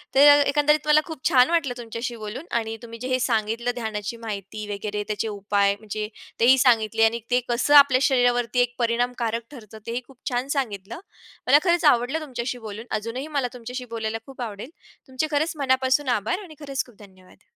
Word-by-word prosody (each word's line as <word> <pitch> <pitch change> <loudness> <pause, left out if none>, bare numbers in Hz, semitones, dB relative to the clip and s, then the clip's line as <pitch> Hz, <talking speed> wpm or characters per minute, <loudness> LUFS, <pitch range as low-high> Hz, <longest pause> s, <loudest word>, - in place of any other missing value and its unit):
तर - - +5 0.3
एकंदरीत 300 +1 +2
मला 305 0 +6
खूप 320 -6 -9
छान 255 -2 +5
वाटलं 315 -7 +1
तुमच्याशी 235 +1 -5
बोलून. 225 +8 -7
आणि 225 -1 -1
तुम्ही 230 0 -9
जे 255 - -5
हे 255 0 +1
सांगितलं 230 0 0
ध्यानाची 220 -1 -4
माहिती 210 -1 -6
वगैरे, 205 +1 -4
त्याचे 215 +1 -2
उपाय 200 -1 +1
म्हणजे 215 0 -5 0.3
तेही 255 +3 +6
सांगितले. 225 -3 +3
आणि 230 +1 +1
ते 250 - +4
कसं 240 +5 +1
आपल्या 275 -3 +7
शरीरावरती 245 -2 +2
एक 245 0 -1
परिणामकारक 235 -1 0
ठरतं 220 -5 -12
तेही 240 +2 -2
खूप 270 -2 -18
छान 250 +2 -2
सांगितलं. 205 - -4 0.5
मला 280 +3 +7
खरंच 345 -2 +2
आवडलं 245 +6 -1
तुमच्याशी 250 -3 -4
बोलून. 215 +3 -7
अजूनही 240 +7 -5
मला 255 -3 +1
तुमच्याशी 250 +1 -7
बोलायला 220 0 -2
खूप 270 -2 -11
आवडेल. 220 +2 -6 0.4
तुमचे 260 +4 -2
खरंच 310 +3 +1
मनापासून 260 0 +1
आभार 350 - -2
आणि 315 -4 -13
खरंच 275 -2 -3
खूप 245 -4 -19
धन्यवाद. 190 -2 -18
245 Hz, 180 wpm, -24 LUFS, 220-265 Hz, 0.5 s, आपल्या